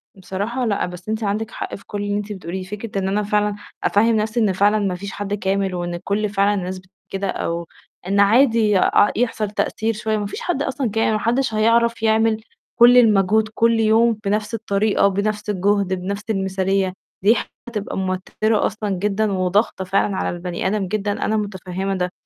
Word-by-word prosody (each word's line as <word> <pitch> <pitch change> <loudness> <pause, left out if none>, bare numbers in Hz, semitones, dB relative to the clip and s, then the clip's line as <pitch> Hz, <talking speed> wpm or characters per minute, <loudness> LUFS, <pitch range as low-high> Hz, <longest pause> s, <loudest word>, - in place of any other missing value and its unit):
بصراحة 205 +7 -3
لأ، 205 -3 0
بس 180 +3 -9
أنتِ 220 0 -2
عندك 210 +2 -2
حق - - -5
في 195 - -14
كُلّ 205 0 -4
اللي 205 0 -1
أنتِ 210 0 -5
بتقوليه، 185 0 -5
فكرة 205 +2 -5
إن 190 - -1
أنا 205 +2 0
فعلًا 210 0 +1 0.3
أفهِّم 225 +2 +3
نَفْسي 215 +2 0
إن 205 -4 +2
فعلًا 205 +3 +3
ما 195 -3 -1
فيش 195 +2 -7
حد 205 +1 -4
كامل، 195 -2 -1
وإن 175 0 -3
كُلّ 205 +4 -1
فعلًا 200 +1 +2
الناس 185 -1 -3
بت 190 0 -22 0.2
كده، 195 0 -3
أو 170 -1 -3 0.4
إن 200 +1 +1
عادي 220 -1 +4
أ 205 - +4
يحصل 225 -3 0
تأثير 220 +1 -1
شويّة، 215 0 -1
ما 205 - -2
فيش 200 - -6
حد 320 -6 -1
أصلًا 270 -3 -2
كا 225 +1 +1
ما 215 - +1
حدّش 235 +1 0
هيعرف 230 +1 +2
يعمل 220 0 +2 0.4
كُلّ 240 +1 +8
المجهود 215 -2 +4
كُلّ 230 +1 +3
يوم 225 +1 +3
بنَفْس 210 +2 -1
الطريقة، 210 -2 +1
وبنَفْس 210 +2 -2
الجهد، 200 0 +1
بنَفْس 200 +3 -4
المثالية، 190 -1 0 0.3
دي 220 +4 +6 0.3
حتبقى 215 -4 -4
موتِّرة 190 +3 0
أصلًا 215 -1 -3
جدًا، 205 +2 0
وضاغطة 190 +2 +1
فعلًا 195 +1 +1
على - - -1
البني 175 +1 -3
آدم 195 -1 -1
جدًا، 205 +1 -1
أنا 220 - +1
مُتَفَهِّمة 195 -1 -3
ده. 180 -1 -2
205 Hz, 185 wpm, -21 LUFS, 190-220 Hz, 0.4 s, كُلّ